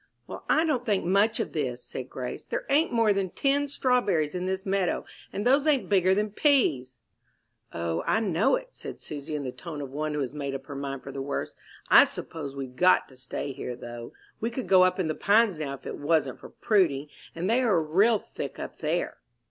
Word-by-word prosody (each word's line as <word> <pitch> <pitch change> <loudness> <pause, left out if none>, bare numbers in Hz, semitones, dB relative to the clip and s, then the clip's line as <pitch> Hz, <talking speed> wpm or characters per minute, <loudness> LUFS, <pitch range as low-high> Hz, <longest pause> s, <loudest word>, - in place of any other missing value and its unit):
"Well, - - -8
I 315 - +4
don't 275 -6 0
think 205 -6 0
much 200 +5 +3
of - - -3
this," 130 -6 -2
said 130 0 -7
Grace; 125 -1 -5
"there - - -4
ain't 300 +4 +3
more 230 -3 +3
than 195 -1 -1
ten 285 +7 +1
strawberries 240 - +1
in 180 0 -3
this 190 +1 -2
meadow, 195 -2 0 0.3
and 205 - -3
those 275 +4 +4
ain't 285 -4 +2
bigger 190 -2 +4
than 210 +1 0
peas." 155 - +2 0.7
"O, 85 0 -2
I - - +3
know 205 - +2
it," - - -6
said - - -8
Susy, 150 +1 -6
in 145 - -3
the 130 - -3
tone 160 +2 -8
of 140 -2 -6
one 150 +1 -2
who 150 - -1
has 135 0 -3
made 140 -2 -4
up 135 0 -7
her 145 - -8
mind 135 -1 -5
for 135 - -7
the 135 0 -5
worst. 140 +1 -4 0.3
"I - - +9
suppose 145 -4 -6
we've 130 -2 -6
got 180 +6 +4
to 130 - -16
stay 130 +2 -5
here, 125 -2 -5
though. 120 -1 -9 0.3
We 230 - -1
could 245 +1 -4
go 185 -1 +6
up 185 +1 +3
in 180 - +1
the 155 - 0
Pines 205 -1 +3
now 140 -3 -3
if - - -18
it - - -5
wasn't 145 -3 +1
for - - -11
Prudy, 165 - +1 0.3
and 170 +2 -2
they 235 +4 +3
are 220 -9 +3
real 195 +9 +3
thick - - -7
up - - -7
there." - - -1
175 Hz, 220 wpm, -27 LUFS, 140-220 Hz, 0.7 s, I